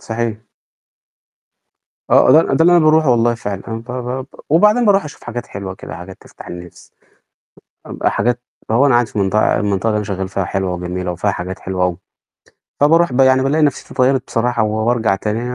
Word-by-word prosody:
صحيح. 110 Hz, -1 st, -3 dB, 1.7 s
آه، -, -, +6 dB
ده 160 Hz, -, +7 dB
ده 160 Hz, -, +3 dB
اللي 175 Hz, -, +5 dB
أنا -, -, +6 dB
بارُوحه 155 Hz, -2 st, +4 dB
والله 120 Hz, 0 st, +2 dB
فعلًا، 100 Hz, -4 st, -5 dB
أنا 115 Hz, -, -3 dB
ب -, -, -11 dB
ب 125 Hz, +1 st, -4 dB
ب 130 Hz, -, -15 dB, 0.2 s
وبعدين 210 Hz, +9 st, +4 dB
بارُُوح 200 Hz, -3 st, +3 dB
أشوف 150 Hz, -, -11 dB
حاجات 120 Hz, +1 st, -6 dB
حلوة 95 Hz, -1 st, -7 dB
كده -, -, -9 dB
حاجات 95 Hz, +2 st, -10 dB
تفتح -, -, -14 dB
النفْس، 85 Hz, 0 st, -11 dB, 1.1 s
حاجات 120 Hz, 0 st, 0 dB, 0.3 s
فهو 120 Hz, +5 st, +3 dB
أنا 135 Hz, -, +3 dB
قاعد 120 Hz, -1 st, +3 dB
في 105 Hz, -, -5 dB
منطقة 100 Hz, +2 st, +2 dB
المنطقة 100 Hz, +1 st, -1 dB
اللي 105 Hz, -, 0 dB
أنا 105 Hz, -, -2 dB
شغال 95 Hz, -2 st, -3 dB
فيها 95 Hz, 0 st, -2 dB
حلوة 95 Hz, -1 st, -2 dB
وجميلة 90 Hz, 0 st, -4 dB
وفيها 95 Hz, +4 st, -1 dB
حاجات 90 Hz, 0 st, -6 dB
حلوة 95 Hz, -1 st, -3 dB
أوي، 90 Hz, -1 st, -1 dB, 0.8 s
فبارُوح 165 Hz, +2 st, +4 dB
ب 125 Hz, -, -1 dB
يعني 130 Hz, 0 st, +4 dB
بالاقي 150 Hz, +4 st, +1 dB
نفْسيّتي 145 Hz, -3 st, -1 dB
اتغيّرت 130 Hz, 0 st, +2 dB
بصراحة 120 Hz, 0 st, 0 dB
وبارجَع 110 Hz, 0 st, 0 dB
تاني 105 Hz, +3 st, -3 dB
115 Hz, 185 wpm, -17 LUFS, 95-130 Hz, 1.7 s, ده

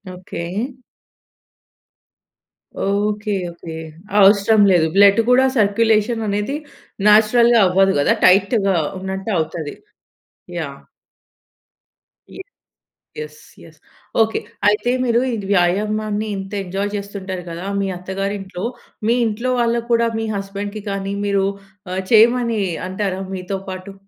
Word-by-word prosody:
Okay. 180 Hz, -2 st, -7 dB, 2.4 s
Okay, 210 Hz, +1 st, -1 dB, 0.2 s
okay. 170 Hz, -1 st, -9 dB, 0.4 s
అవసరం 200 Hz, +2 st, +5 dB
లేదు. 165 Hz, -3 st, +4 dB
Blood 200 Hz, +1 st, +6 dB
కూడా 255 Hz, +1 st, +5 dB
సర్కులేషన్ 220 Hz, +2 st, +2 dB
అనేది 205 Hz, +7 st, -1 dB, 0.5 s
నేచురల్‌గా 230 Hz, +2 st, +5 dB
అవ్వదు 190 Hz, +1 st, +3 dB
కదా! 145 Hz, -, +3 dB
టైట్‌గా 195 Hz, +1 st, +4 dB, 0.2 s
ఉన్నట్టవుతది. 185 Hz, -5 st, -3 dB, 0.8 s
యాహ్. -, -, -5 dB, 1.5 s
ఇ -, -, -13 dB, 0.8 s
యెస్. 460 Hz, 0 st, -8 dB, 0.2 s
యెస్. -, -, -17 dB, 0.4 s
ఓకే. 220 Hz, 0 st, +1 dB, 0.3 s
అయితే 210 Hz, +3 st, +2 dB
మీరు 235 Hz, -2 st, +2 dB, 0.2 s
ఇది 200 Hz, -3 st, -6 dB
వ్యాయామాన్ని 210 Hz, +4 st, 0 dB
ఇంత 195 Hz, 0 st, -7 dB
ఎంజాయ్ 195 Hz, +2 st, -3 dB
చేస్తుంటారు 195 Hz, -2 st, -5 dB
కదా! 170 Hz, +2 st, -6 dB, 0.2 s
మీ 195 Hz, -, -1 dB
అత్తగారింట్లో, 195 Hz, 0 st, -5 dB, 0.4 s
మీ 235 Hz, -, +3 dB
ఇంట్లోవాళ్ళకి 235 Hz, +1 st, -1 dB
కూడా 235 Hz, 0 st, +3 dB
మీ 225 Hz, -, -2 dB
హస్బాండ్‌కి 200 Hz, +1 st, -5 dB
కానీ 195 Hz, 0 st, -3 dB
మీరు 200 Hz, -1 st, +1 dB, 0.5 s
ఆహ్, 185 Hz, +1 st, -2 dB
చేయమని 230 Hz, 0 st, +4 dB, 0.3 s
అంటారా 190 Hz, 0 st, -3 dB
మీతో 190 Hz, +1 st, -4 dB
పాటు? 185 Hz, +1 st, -7 dB
200 Hz, 100 wpm, -19 LUFS, 190-220 Hz, 2.4 s, Blood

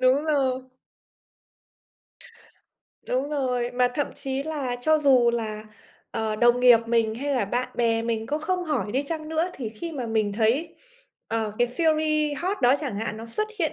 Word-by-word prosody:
Đúng 260 Hz, +4 st, +3 dB
rồi. 265 Hz, -4 st, +1 dB, 2.4 s
Đúng 260 Hz, +3 st, -1 dB
rồi, 250 Hz, -4 st, -1 dB
mà 250 Hz, 0 st, +2 dB
thậm 290 Hz, -, 0 dB
chí 275 Hz, -1 st, -3 dB
là 280 Hz, -5 st, -3 dB
cho 310 Hz, +4 st, +3 dB
dù 255 Hz, -5 st, +5 dB
là, 220 Hz, -2 st, -3 dB, 0.5 s
ờ, 220 Hz, -1 st, -2 dB
đồng 240 Hz, +2 st, +4 dB
nghiệp 245 Hz, -2 st, +8 dB
mình 230 Hz, -1 st, +1 dB
hay 280 Hz, +5 st, -3 dB
là 240 Hz, -, +1 dB
bạn 245 Hz, +5 st, -2 dB
bè 230 Hz, -1 st, +1 dB
mình 225 Hz, -1 st, -2 dB
có 300 Hz, +1 st, -1 dB
không 360 Hz, +3 st, -1 dB
hỏi 275 Hz, -9 st, -1 dB
đi 270 Hz, +3 st, +1 dB
chăng 310 Hz, +1 st, -5 dB
nữa 320 Hz, +3 st, 0 dB
thì 240 Hz, -5 st, -4 dB
khi 325 Hz, +10 st, -7 dB
mà 255 Hz, -5 st, -4 dB
mình 215 Hz, -2 st, 0 dB
thấy, 235 Hz, +10 st, +1 dB, 0.5 s
ờ, 220 Hz, -2 st, -1 dB
cái 240 Hz, 0 st, +3 dB
series 305 Hz, 0 st, +1 dB
hot 380 Hz, +4 st, -1 dB
đó 245 Hz, +2 st, +6 dB
chẳng 265 Hz, -9 st, -3 dB
hạn 215 Hz, 0 st, -3 dB
nó 225 Hz, +1 st, -8 dB
xuất 430 Hz, -, -2 dB
hiện 325 Hz, -4 st, 0 dB
255 Hz, 180 wpm, -25 LUFS, 230-300 Hz, 2.4 s, nghiệp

